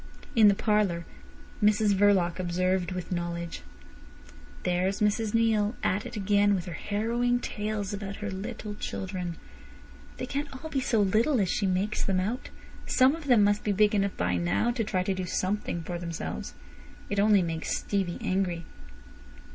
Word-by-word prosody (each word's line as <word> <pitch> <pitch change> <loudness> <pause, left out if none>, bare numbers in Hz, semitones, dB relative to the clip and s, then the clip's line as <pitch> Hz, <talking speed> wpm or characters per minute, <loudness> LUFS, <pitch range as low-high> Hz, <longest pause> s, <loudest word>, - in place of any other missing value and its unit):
In 220 -2 +7
the 200 - +5
parlour 200 -6 +1 0.6
Mrs 210 0 +4
Verloc 190 -3 +3
observed, 185 0 0
with 185 -1 -5
knowledge: 170 -1 -3 1.0
"There's 180 +2 0
Mrs 210 +1 +1
Neale 220 -1 +2
at 205 +6 0
it 240 - -8
again 205 0 +3
with 180 - -3
her 175 - -6
harrowing 235 +6 0
tales 210 -3 -3
about 200 -1 -5
her 210 0 -5
little 210 +2 -5
children. 185 -4 -4 0.8
They - - -3
can't 285 +1 -3 0.2
be 275 - +1
all - - -3
so 225 -4 +2
little 220 +7 +3
as 190 -3 +1
she 200 - 0
makes 190 +3 0
them 190 -2 +1
out. 220 +8 -3 0.4
Some 260 +2 +5
of 325 -2 -9
them 245 -6 +5
must 205 +1 +2
be 210 - +1
big 210 +2 +4
enough 200 -1 0
by 90 0 +1
now 90 - +1
to 235 -1 -1
try 185 -3 0
to 195 - 0
do 185 -1 -4
something 185 -2 -1
for 175 +1 -4
themselves. 170 -1 -5 0.6
It 205 - +1
only 205 -2 +5
makes 165 -1 -2
Stevie 195 -4 -2
angry." 180 -3 -1
200 Hz, 165 wpm, -28 LUFS, 180-215 Hz, 1.0 s, In